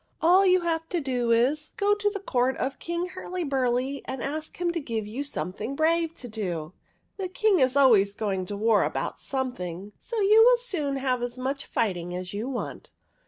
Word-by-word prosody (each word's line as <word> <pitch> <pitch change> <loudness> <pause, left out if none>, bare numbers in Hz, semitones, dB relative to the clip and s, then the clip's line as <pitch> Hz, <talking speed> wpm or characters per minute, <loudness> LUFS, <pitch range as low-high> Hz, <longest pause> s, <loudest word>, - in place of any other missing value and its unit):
" - - -42
All 370 +4 +6
you 370 0 +5
have 325 -1 -2
to 355 - 0
do 250 -5 -1
is 265 +7 +2
to - - -32
go 405 +1 +3
to 415 0 +1
the 405 0 -5
court 260 -8 0
of 270 +1 -3
King 340 +1 -3
Hurlyburly, 275 -8 -1
and 260 -2 -5
ask 310 +3 -4
him 350 -1 +1
to 340 - -2
give 230 -7 -3
you 220 +6 -5
something 210 - -3
brave 330 +2 +1
to 250 - -8
do. 180 -7 -4 0.4
The 385 -2 -2
King 430 -2 +2
is 260 0 +3
always 210 -8 +5
going 195 -4 -2
to 205 - -4
war 220 0 +3
about - - -3
something, 205 -8 -4
so 470 -2 -4
you 425 +2 +6
will - - +6
soon 350 - -2
have 260 -2 0
as 245 +1 -4
much 270 +2 -3
fighting 175 -5 -1
as 180 +1 -5
you 215 +6 -3
want. 255 -3 -5
270 Hz, 205 wpm, -26 LUFS, 225-340 Hz, 0.4 s, All